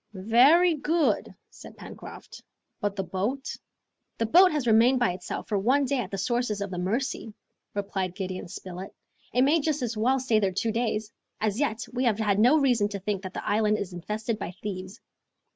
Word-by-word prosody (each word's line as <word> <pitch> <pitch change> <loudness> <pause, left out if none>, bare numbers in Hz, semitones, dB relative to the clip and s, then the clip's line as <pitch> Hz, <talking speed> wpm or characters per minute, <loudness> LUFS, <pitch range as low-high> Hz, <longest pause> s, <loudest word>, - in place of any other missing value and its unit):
"Very 260 - +5
good," 315 +1 0 0.2
said - - -13
Pencroft. - - -11 0.4
"But 205 -1 -2
the 195 - -2
boat?" 225 +10 -3 0.6
"The 230 - 0
boat 365 +11 +6
has 300 -4 -1
remained 235 +3 +5
by 215 -7 +2
itself 180 0 -6
for 205 -3 0
one 265 +8 +2
day 270 0 0
at 210 -7 -3
the 195 - -4
sources 235 +1 -1
of 200 -1 -4
the 180 - -4
Mercy," 225 +4 -2 0.4
replied 195 -3 -3
Gideon 185 -2 -5
Spilett; 185 +1 -8 0.4
"it 250 - +3
may 300 +5 +4
just 300 -2 -1
as 235 -1 -2
well 250 +5 +2
stay 240 -4 +2
there 195 -3 0
two 225 +4 0
days! 220 -1 -2 0.3
As 215 +1 -1
yet, 235 -6 -1
we 250 +1 -1
have 225 -4 +2
had 210 -2 +1
no 250 +8 +6
reason 245 -8 +3
to 200 -1 -5
think 200 0 -2
that 185 -1 -8
the - - -5
island 215 0 +2
is 190 -3 -5
infested 215 +5 -3
by 180 -2 -6
thieves!" 190 +1 -6
220 Hz, 195 wpm, -27 LUFS, 195-255 Hz, 0.6 s, boat